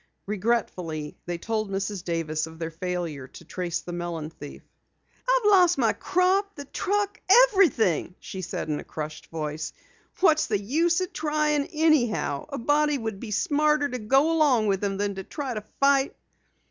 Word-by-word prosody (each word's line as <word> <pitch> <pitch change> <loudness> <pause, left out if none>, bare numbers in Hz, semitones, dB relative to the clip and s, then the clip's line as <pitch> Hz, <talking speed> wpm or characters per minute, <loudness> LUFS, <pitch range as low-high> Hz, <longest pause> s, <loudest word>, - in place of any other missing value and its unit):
Regretfully, 185 -7 -2
they 175 -1 -2
told 215 +3 -2
Mrs. 195 -1 -3
Davis 160 -2 -2
of 160 0 -12
their 165 0 -4
failure 170 -5 -4
to 170 - -14
trace 175 0 -3
the 175 - -7
melon 170 -3 -4
thief. 145 -2 -11 0.7
"I've - - +3
lost 365 -4 +5
my - - +3
crop, 385 +3 +1
the 285 -2 -8
truck 410 +6 -1 0.3
everything," 225 - +2
she 190 - -7
said 170 - -4
in 150 -1 -1
a - - -7
crushed 155 0 -7
voice. 155 -1 -4 0.5
"What's 315 -4 +4
the 215 - +1
use 330 - +1
trying 300 -1 0
anyhow? 300 - +1
A 280 - -4
body 295 +3 +2
would 220 -5 -4
be 230 - -7
smarter 300 - +2
to 250 - -4
go 270 +8 +3
along 290 -9 +3
with 195 -1 0
'em 195 -1 -1
than 200 0 -1
to 195 0 -6
try 275 - -5
to 215 - -4 0.2
fight." 275 0 +3
220 Hz, 165 wpm, -26 LUFS, -, 0.7 s, lost